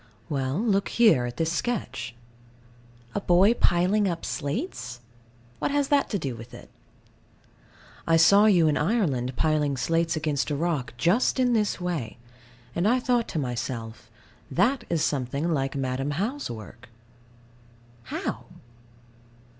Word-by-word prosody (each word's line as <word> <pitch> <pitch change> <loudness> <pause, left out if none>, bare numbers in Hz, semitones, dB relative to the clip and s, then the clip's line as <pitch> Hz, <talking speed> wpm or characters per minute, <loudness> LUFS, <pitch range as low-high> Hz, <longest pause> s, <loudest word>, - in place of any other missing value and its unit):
Well, 135 -1 -1
look 205 -3 +1
here, 210 - +4
at 120 - -8
this 165 0 0
sketch. 170 - -3 1.0
A 205 - -2
boy 190 +5 +5
piling 195 0 +2
up 170 -2 -3
slates? 145 - -4 0.6
What - - 0
has 285 -1 0
that 285 -1 +2
to 205 - -1
do 135 -8 -3
with 115 +2 -11
it? - - -13 1.4
I 165 0 +5
saw 200 +5 +6
you 175 -6 +5
in 150 - +2
Ireland 150 - 0
piling 150 -3 +1
slates 165 +5 0
against 155 -2 -1
a 145 - -1
rock 145 -7 -2
just 195 - +2
in 250 -1 +3
this 210 -4 +1
way. 170 -11 -3 0.6
And 175 +4 +1
I 250 +3 +3
thought 245 -2 +1
to - - -5
myself 120 -4 -4 0.4
"That 235 +7 +1
is 165 -3 +1
something 140 +4 -1
like 135 -1 -1
Madam 135 +1 -2
How's 250 +10 -2
work." 115 +1 -10 1.2
How? - - -4
165 Hz, 140 wpm, -26 LUFS, 130-205 Hz, 1.4 s, saw